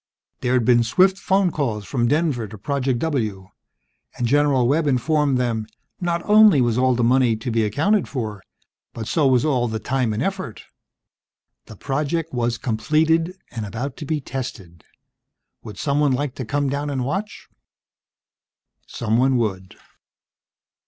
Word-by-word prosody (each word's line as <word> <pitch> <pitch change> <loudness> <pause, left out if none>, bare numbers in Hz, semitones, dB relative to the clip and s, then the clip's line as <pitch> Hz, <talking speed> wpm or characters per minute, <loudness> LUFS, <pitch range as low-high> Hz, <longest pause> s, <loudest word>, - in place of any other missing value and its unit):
There'd 125 -1 +1
been 120 0 +5
swift 185 +11 +3
phone 195 -2 +2
calls 115 -10 -2
from 120 -1 0
Denver 145 -5 0
to 105 +2 -10
Project 135 +3 -1
W, 110 -10 -2 0.7
and, 120 - -1
General 140 -1 +3
Webb 150 +4 +1
informed 140 +1 +1
them, 115 -3 -1 0.3
not 170 -1 -1
only 210 -6 +7
was 120 -3 +2
all 130 0 +2
the 120 - 0
money 125 -1 +3
to 110 +3 -5
be 115 0 +1
accounted 155 - +1
for, 110 -7 -4 0.5
but 110 -2 -5
so 155 -4 +2
was 130 +1 +3
all 130 -5 +1
the 110 -1 -3
time 125 +2 -1
and 110 +5 -2
effort: 190 - -4 1.0
the 110 - -11
project 150 - -2
was 120 -1 -1
completed, 160 +8 +1 0.2
and 115 -2 -5
about 120 +6 -5
to 150 - -7
be 155 +1 -1
tested. 110 - -7 0.8
Would 105 -2 -10
someone 145 +1 +1
like 140 0 -2
to 130 - -6
come 145 +5 -1
down 140 +2 -2
and 130 -3 -2
watch? 195 +9 -4 1.4
Someone 120 +4 +1
would. 95 -5 -3
130 Hz, 150 wpm, -22 LUFS, 115-150 Hz, 1.4 s, only